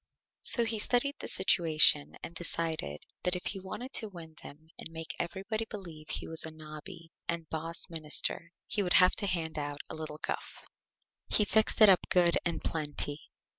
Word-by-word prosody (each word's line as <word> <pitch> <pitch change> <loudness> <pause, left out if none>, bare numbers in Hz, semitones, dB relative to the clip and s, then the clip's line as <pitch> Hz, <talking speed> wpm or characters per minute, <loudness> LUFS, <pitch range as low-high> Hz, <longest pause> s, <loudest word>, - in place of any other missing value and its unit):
So 235 - +4
he 225 -1 0
studied 255 +6 +3
the - - -5
Situation 155 - +5
and - - -7
decided 165 - -2 0.2
that 180 0 +1
if 180 - -6
he 195 - -2
wanted 240 +8 -7
to 220 - +3
Win 165 -4 -11
them 155 +3 -14
and - - -5
make 160 0 -7
everybody 195 +6 -2
believe 170 -8 -9
he - - -3
was 160 0 -1
a 160 - -1
Nobby 160 +2 -10 0.2
and 170 -1 -2
Boss 165 +2 -3
Minister 165 0 0
he 210 - -1
would 180 -2 0
have 180 -1 +6
to 200 - -1
hand 160 -4 -2
out 145 0 -5
a - - -6
little 155 -1 -7
Guff. - - -6 0.6
He 210 - +3
fixed 220 +2 +2
it 215 - +10
up 185 -2 +6
Good 175 -2 +3
and 170 - -3
Plenty. 145 -1 -3
170 Hz, 180 wpm, -30 LUFS, 155-190 Hz, 0.6 s, it